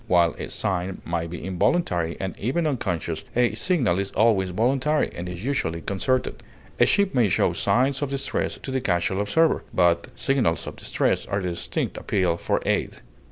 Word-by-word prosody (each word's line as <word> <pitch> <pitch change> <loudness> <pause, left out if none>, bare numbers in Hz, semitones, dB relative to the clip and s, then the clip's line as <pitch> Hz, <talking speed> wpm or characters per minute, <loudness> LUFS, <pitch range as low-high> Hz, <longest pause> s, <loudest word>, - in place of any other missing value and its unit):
While 85 -4 +4
a - - -5
sign 95 -1 -1
may 85 -1 -2
be 85 0 -7
involuntary, 90 - 0
and 95 -1 -4
even 135 +10 0
unconscious, 90 - -2
a 120 0 +3
signal 125 - +1
is 100 0 -1
always 100 -4 +3
voluntary, 130 +10 +1
and 90 +1 -5
is 90 +4 -7
usually 85 -12 -1
concerted; 125 +8 -1 0.4
a - - +6
ship 200 -1 +2
may 120 -5 +3
show - - +2
signs 135 +3 +1
of 145 - -1
distress 135 0 -2
to 135 - -7
the 130 0 0
casual 95 0 0
observer, 160 +11 +2
but 85 -2 +2
signals 125 -12 +1
of - - -7
distress - - -1
are 100 - -1
a 100 - -2
distinct 85 -2 -3
appeal 90 -4 0
for - - -1
aid. - - 0
100 Hz, 175 wpm, -24 LUFS, 90-130 Hz, 0.4 s, a